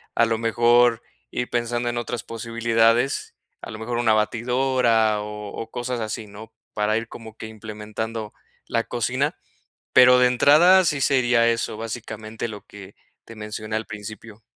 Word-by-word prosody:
a 115 - +4
lo 115 -1 -1
mejor 120 +1 +3 0.3
ir 125 - -3
pensando 120 0 -1
en 120 - -3
otras 120 0 -4
posibilidades, 115 +2 0 0.3
a - - -8
lo 110 - -7
mejor 120 +2 -4
una 110 -2 +3
batidora 115 -1 +1
o 105 -1 -7
o 115 - -7
cosas 120 0 -4
así, 110 0 -4
¿no?, 105 +2 -12 0.2
para 105 +1 +1
ir 115 0 -4
como 110 -2 -11
que - - -7
implementando 110 0 -6 0.3
la - - -1
cocina. - - -1 0.6
Pero, 125 0 +7
de 125 - +5
entrada, 165 +9 +5
sí 145 -4 0
sería 120 -4 +3
eso, 115 -1 -1
básicamente, 110 0 -6
lo 105 -2 -9
que 100 -1 -13 0.3
te 115 - -12
mencioné 110 0 -6
al 110 0 -2
principio. 110 +1 -9
115 Hz, 155 wpm, -23 LUFS, 110-120 Hz, 0.6 s, Pero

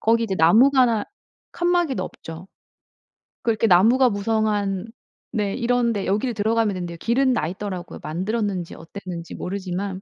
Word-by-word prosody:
거기 230 +1 +2
이제 200 -4 -2
나무가 235 - +5 0.5
칸막이도 345 - +1
없죠. 165 -1 -9 1.0
그 235 - +2
이렇게 220 +1 +1
나무가 230 +8 +5
무성한 205 -2 -1 0.4
네 205 -4 -1
이런 245 -1 +1
데 200 -2 -3
여기를 215 +6 0
들어가면 220 0 +1
된대요. 175 -2 -5
길은 255 +5 +2
나 155 -10 0
있더라고요 185 0 -6
만들었는지 190 +2 -2
어땠는지 170 0 -8
모르지만. 190 0 -4
205 Hz, 350 characters per minute, -23 LUFS, 185-235 Hz, 1.0 s, 나무가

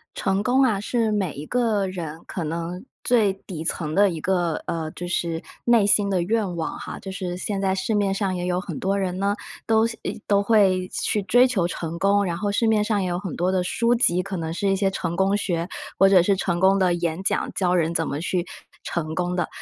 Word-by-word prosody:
成 195 +1 0
功 255 +4 +3
啊 220 -7 +2
是 225 +1 0
每 195 -6 0
一 145 +2 -7
个 225 -4 +1
人 170 -4 -6
可 180 - -4
能 170 +4 -4 0.2
最 225 -6 +3
底 185 -4 -8
层 155 -1 -2
的 200 0 +5
一 165 -3 -5
个， 175 -2 0
呃， 160 -2 -3
就 175 - -7
是 170 -1 -2 0.2
内 235 -4 +4
心 205 -1 +3
的 190 -2 +1
愿 195 0 -1
望 165 - -3
哈， - - -7
就 190 - -8
是 180 -2 -4
现 200 +1 -3
在 190 -1 +1
市 215 +4 -1
面 200 -2 +2
上 195 -2 -1
也 175 - -3
有 180 0 0
很 180 -6 -6
多 195 +1 0
人 185 -2 -2
呢， 200 +1 +1 0.3
都 225 0 +4
希， 230 -1 -6
诶， - - -5
都 200 -1 +3
会 195 -4 +3
去 210 - -1
追 245 +6 +5
求 210 -9 +1
成 170 -1 -5
功， 200 +3 +3
然 175 -3 -2
后 205 +3 -1
市 225 +3 +1
面 215 -2 +3
上 210 -2 0
也 185 - -1
有 175 0 -1
很 185 -2 -5
多 180 +2 +1
的 185 -1 +1
书 235 +6 +1
籍， 185 -7 +3
可 195 0 -5
能 165 -2 -3
是 185 +4 -1
一 195 - +2
些 195 0 +1
成 170 -3 -3
功 195 +2 +2
学， 170 -4 -1 0.3
或 195 - +7
者 190 -3 +6
是 195 +2 +2
成 175 -2 -1
功 190 +1 +4
的 185 -2 +3
演 170 0 -2
讲， - - 0
教 180 -2 +1
人 170 -1 +1
怎 165 -1 0
么 145 - -3
去 180 +1 -1 0.4
成 160 -2 -3
功 180 +1 -1
的， 175 - 0
190 Hz, 255 characters per minute, -23 LUFS, 175-205 Hz, 0.4 s, 或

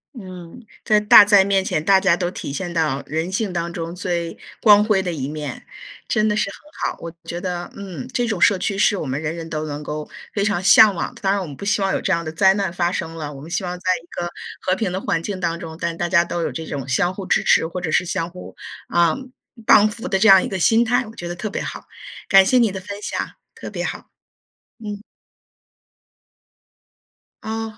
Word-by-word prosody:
嗯， 185 +1 -10 0.2
在 215 -1 +3
大 210 0 +9
灾 205 -1 +5
面 195 -1 +1
前， 155 -5 -1
大 195 +3 +5
家 190 -3 +3
都 175 0 -2
体 160 - -6
现 175 +5 -4
到 155 -5 0
人 160 +4 -3
性 200 -1 -2
当 170 -1 -2
中 170 -1 -5
最 175 -2 -3 0.3
光 210 -2 +7
辉 210 -3 +2
的 180 - -2
一 140 -5 -4
面， 150 -3 -6 0.4
真 215 0 +1
的 210 - +1
是 210 - 0
很 300 +9 -5
好。 - - -11
我 170 - -7
觉 170 - -5
得， 175 -1 -4
嗯， 185 -9 -7
这 245 - 0
种 205 -6 -2
社 200 - +5
区 195 +2 -2
是 205 +1 +3
我 160 - -4
们 135 +2 -3
人 160 +1 -3
人 165 -1 -7
都 155 -1 -4
能 145 0 -5
够 150 0 -5 0.2
非 200 - 0
常 200 -3 0
向 205 +1 +7
往 170 - -3
的。 - - -16
当 195 - +1
然， 200 - +1
我 190 - -4
们 145 -4 -9
不 - - -10
希 205 0 +1
望 195 - +1
有 - - -1
这 - - -1
样 170 -2 0
的 155 - -4
灾 190 +4 +4
难 195 -4 -2
发 175 -1 0
生 165 -2 -4
了。 150 -2 -5
我 135 -2 -10
们 160 +4 -10
希 170 +3 -1
望 180 0 -4
在 185 - -22 0.2
一 - - -21
个 175 - -4 0.3
和 185 - +1
平 195 -2 -2
的 185 - -2
环 165 - -1
境 190 +2 -5
当 170 -2 -2
中， 160 -2 -8
但 170 0 -2
大 175 +1 -2
家 170 -1 +4
都 175 - -3
有 - - -1
这 160 - -6
种 140 -4 -5
相 175 +7 +1
互 195 0 -7
支 - - +2
持， 160 - +3
或 180 +2 -5
者 170 -3 -3
是 - - +3
相 165 -1 -2
互， 180 +1 -11 0.3
啊， 170 -2 +3 0.5
帮 210 0 +7
扶 225 +4 -6
的 195 - +1
这 210 +4 +3
样 190 -2 +8
一 - - -2
个 190 - -3
心 225 +6 +4
态， 245 +2 +1
我 220 +1 -12
觉 175 - -6
得 175 - -5
特 175 +5 -4
别 - - -4
好。 - - -6 0.4
感 195 -1 +7
谢 255 +7 +3
你 230 -4 +3
的 190 - -5
分 200 +2 -8
享， - - -3 0.2
特 - - -9
别 - - -4
好， - - -6 0.7
嗯。 210 -2 -7 2.4
哦。 220 0 -5
180 Hz, 260 characters per minute, -21 LUFS, 165-200 Hz, 2.4 s, 大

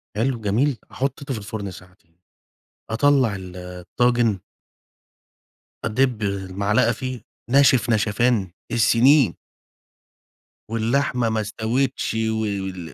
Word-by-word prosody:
حلو، 120 +2 0
جميل، 115 +6 +1
حطيته 135 +1 -3
في 115 - -4
الفرن 100 -1 -6
ساعتين، 90 -2 -17 0.7
أطلّع 130 -2 +3
ال 90 -1 -9
الطاجن 100 +5 0 1.5
أدِّب 120 0 +1
المعلقة 100 +3 0
فيه، 130 +1 -5 0.3
ناشف 130 -4 +4
نشفان 110 -2 +1 0.2
السنين. 120 +3 +4 1.4
واللحمة 120 +1 +1
ما 110 0 0
استوِتش 115 +6 -1
و 110 0 -1
وال 95 -6 -4
110 Hz, 95 wpm, -22 LUFS, 100-125 Hz, 1.5 s, ناشف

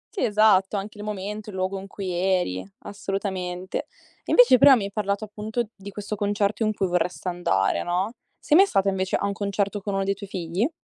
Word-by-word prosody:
Sì, - - -1
esatto. 210 -2 +4
Anche 205 +1 -6
il - - -6
momento, 210 +1 -5
il 190 - -8
luogo 190 +1 -2
in 195 - -9
cui 195 -2 -5
eri; 175 - 0 0.2
assolutamente. 190 -2 -4 0.4
Invece 475 - +6
però 280 -2 +9
mi 215 - -1
hai 200 - -4
parlato 200 0 -1
appunto 215 +2 -4
di 200 +1 -10
questo 205 +1 -5
concerto 205 +1 0
in 215 - +2
cui 195 - 0
vorresti 180 +1 -1
andare, 175 0 +1
no: 185 +6 -1 0.2
sei 300 - +1
mai 390 +3 +7
stata 195 - +2
invece 190 -1 -1
a - - 0
un 200 - -1
concerto 200 0 -2
con 200 0 -3
uno 195 - +1
dei 195 +1 +1
tuoi 200 0 -10
figli? 185 - -1
200 Hz, 205 wpm, -24 LUFS, 190-210 Hz, 0.4 s, però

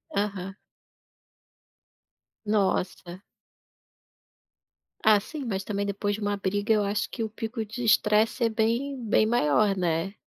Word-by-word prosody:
Aham. 200 -1 -2 1.9
Nossa. 190 -3 -1 1.8
Ah 215 -1 +6
sim, 290 +7 -7
mas 195 -4 -2
também 200 -1 -2
depois 200 0 -1
de 215 - -9
uma 205 0 -1
briga 205 +2 -1
eu 210 - +2
acho 205 +1 -1
que 230 - -3
o 220 - -3
pico 225 +1 -4
de 235 +4 -6
estresse 215 +2 +3
é - - +2
bem 235 +4 -1
bem 215 0 +3
maior, 205 -2 +2
né. 175 +3 -1
210 Hz, 130 wpm, -26 LUFS, 200-220 Hz, 1.9 s, Ah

